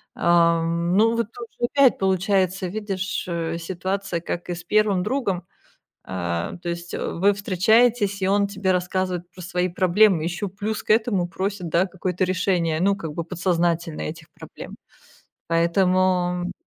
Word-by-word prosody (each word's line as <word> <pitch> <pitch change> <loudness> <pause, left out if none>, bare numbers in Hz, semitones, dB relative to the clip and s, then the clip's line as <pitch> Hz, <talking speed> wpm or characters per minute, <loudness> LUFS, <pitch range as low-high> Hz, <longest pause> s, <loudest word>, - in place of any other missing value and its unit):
Ам, 170 +1 +2
ну 225 +2 +4
вот 230 -2 0
тоже 240 0 -5
опять 275 -3 +5
получается, 190 0 +1
видишь, 195 -1 -3
э, 165 -1 -2
ситуация, 185 +1 -3
как 175 +1 -5
и - - -1
с 170 - -8
1 210 -2 +2
другом. 200 -7 -2 0.6
А, 85 - -3
то 175 - -3
есть, 170 0 -5
э, - - -3
вы 200 +4 +2
встречаетесь, 205 +2 +2
и 190 - +1
он 200 +1 +3
тебе 195 -1 -1
рассказывает 180 -1 -1
про 185 - -12
свои 180 0 -1
проблемы. 185 0 +3
Еще 175 +4 -2
плюс 205 +3 -4
к - - 0
этому 215 -5 +2
просит, 190 -1 -3
да, 170 +4 +2
какое-то 185 0 -2
решение, 180 -3 0
ну, 200 +2 +3
как 165 -6 -6
бы 170 - -2
подсознательно 170 -1 -1
этих 155 0 -6
проблем. - - -10 0.7
Поэтому 180 +1 +2
185 Hz, 150 wpm, -23 LUFS, 170-200 Hz, 0.7 s, опять